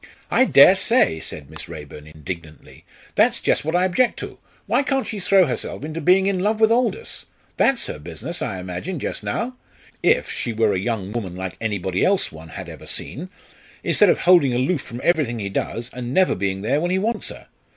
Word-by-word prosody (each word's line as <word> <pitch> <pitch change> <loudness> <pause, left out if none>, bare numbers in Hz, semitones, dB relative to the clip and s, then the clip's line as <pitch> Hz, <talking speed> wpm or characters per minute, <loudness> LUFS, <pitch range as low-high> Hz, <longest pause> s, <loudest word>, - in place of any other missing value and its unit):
"I - - +5
dare - - +7
say!" 80 - +3
said 75 -2 -7
Miss 80 - -9
Raeburn, 75 0 -9
indignantly. 80 +1 -9 0.3
"That's - - +3
just - - +1
what 160 +3 -1
I 180 +1 +3
object 215 +7 +2
to. - - -8 0.3
Why - - +2
can't 270 -2 0
she 215 - -5
throw 190 0 +4
herself 130 -1 -4
into 155 +2 -5
being 185 +5 +4
in 195 -2 +1
love 210 +3 0
with 220 0 +5
Aldous! 250 - -1 0.3
That's 270 -3 +3
her - - -6
business, 75 - -5
I 95 - -3
imagine, 90 - -5
just - - -3
now 250 +2 -3 0.5
if - - +2
she 120 - -3
were 110 -2 +2
a 95 - 0
young 100 -2 -3
woman 105 -6 -4
like 95 -1 -5
anybody 95 -4 -1
else 195 0 +2
one 80 0 -12
had - - -8
ever - - -10
seen 170 +8 -5 0.5
instead 205 - +4
of - - +2
holding 170 -8 +5
aloof 135 +5 +1
from 120 +2 -8
everything 150 -9 +1
he 100 -3 -3
does, 115 +4 -3
and 125 0 -5
never 185 -1 +4
being 95 0 -2
there 135 +7 +1
when 175 - 0
he 185 - +1
wants 225 +5 -1
her. - - -11
125 Hz, 205 wpm, -22 LUFS, -, 0.5 s, dare